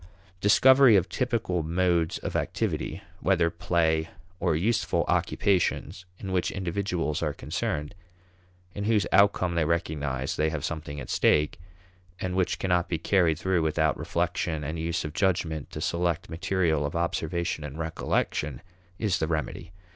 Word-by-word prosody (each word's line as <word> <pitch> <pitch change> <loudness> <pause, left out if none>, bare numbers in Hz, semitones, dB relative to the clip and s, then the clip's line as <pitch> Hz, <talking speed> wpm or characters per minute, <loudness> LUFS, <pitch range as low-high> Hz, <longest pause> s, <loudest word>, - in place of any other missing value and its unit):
Discovery 130 +5 +6
of 90 -3 +2
typical 115 -8 -1
modes 85 0 +1
of - - -5
activity, - - -2 0.2
whether 85 -3 +2
play 80 -1 +1 0.3
or 85 -3 +1
useful 110 +8 +1
occupations, 95 -2 0
in 95 - -6
which 90 -2 +1
individuals 90 -4 -2
are - - -1
concerned, 75 0 -3 0.8
in 100 - -4
whose 105 -4 +2
outcome 95 -3 +4
they 85 -1 +2
recognize 75 -5 -1
they 80 +1 +2
have 75 -2 -3
something 75 -3 -5
at 65 - -6
stake, 75 +2 +2 0.6
and 90 0 -3
which 95 -1 +1
cannot 90 -2 +1
be 85 - 0
carried 85 -2 +2
through 95 -2 +1
without 80 0 +1
reflection 80 -3 -2
and 80 +3 -4
use 85 +1 -2
of 75 - -5
judgment 85 -5 0
to - - -7
select 85 +1 -1
material 85 -3 0
of 70 +2 -3
observation 85 -1 -1
and 75 0 -7
recollection, 80 -4 -2 0.3
is 100 -3 0
the 80 - 0
remedy. 80 +1 -3
85 Hz, 145 wpm, -27 LUFS, 80-95 Hz, 0.8 s, Discovery